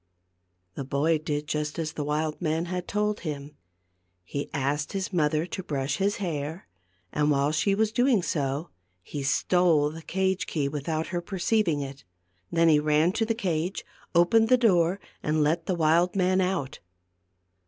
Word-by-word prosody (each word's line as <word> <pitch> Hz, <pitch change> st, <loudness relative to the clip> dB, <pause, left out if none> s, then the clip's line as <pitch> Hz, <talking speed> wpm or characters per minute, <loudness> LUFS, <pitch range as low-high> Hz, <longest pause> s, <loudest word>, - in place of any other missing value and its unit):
The 140 Hz, -, -5 dB
boy 145 Hz, +4 st, +1 dB
did 150 Hz, -1 st, -3 dB
just 150 Hz, 0 st, -2 dB
as 155 Hz, -2 st, -3 dB
the 150 Hz, -, -3 dB
wild 150 Hz, +2 st, -2 dB
man 160 Hz, 0 st, 0 dB
had 180 Hz, 0 st, -4 dB
told 210 Hz, 0 st, 0 dB
him. 145 Hz, -2 st, -6 dB, 0.7 s
He 140 Hz, +10 st, -5 dB
asked 140 Hz, 0 st, -1 dB
his 195 Hz, 0 st, -3 dB
mother 155 Hz, -1 st, +2 dB
to 185 Hz, -, -5 dB
brush 140 Hz, -4 st, -2 dB
his 200 Hz, +1 st, +1 dB
hair, 160 Hz, -2 st, -4 dB, 0.5 s
and 150 Hz, 0 st, +2 dB
while 140 Hz, 0 st, +2 dB
she 195 Hz, +6 st, +1 dB
was 215 Hz, +1 st, +1 dB
doing 245 Hz, -4 st, +3 dB
so, 145 Hz, 0 st, -2 dB, 0.3 s
he 145 Hz, -, -5 dB
stole 150 Hz, +2 st, +2 dB
the 165 Hz, +1 st, -9 dB
cage 190 Hz, +2 st, -1 dB
key 145 Hz, -4 st, -1 dB
without 155 Hz, +3 st, -3 dB
her 175 Hz, -, 0 dB
perceiving 185 Hz, -3 st, 0 dB
it. 140 Hz, 0 st, -7 dB, 0.5 s
He -, -, -7 dB
then 165 Hz, -3 st, +5 dB
ran 155 Hz, +3 st, +3 dB
to 225 Hz, +2 st, -1 dB
the 225 Hz, -, 0 dB
cage, 180 Hz, -4 st, -2 dB, 0.3 s
opened 220 Hz, +7 st, +5 dB
the 255 Hz, -, +6 dB
door, 185 Hz, -5 st, +3 dB, 0.2 s
and 155 Hz, 0 st, +1 dB
let 160 Hz, +3 st, 0 dB
the 185 Hz, -, +1 dB
wild 170 Hz, +3 st, +3 dB
man 185 Hz, 0 st, +2 dB
out. 170 Hz, -7 st, -2 dB
160 Hz, 165 wpm, -27 LUFS, 150-185 Hz, 0.7 s, the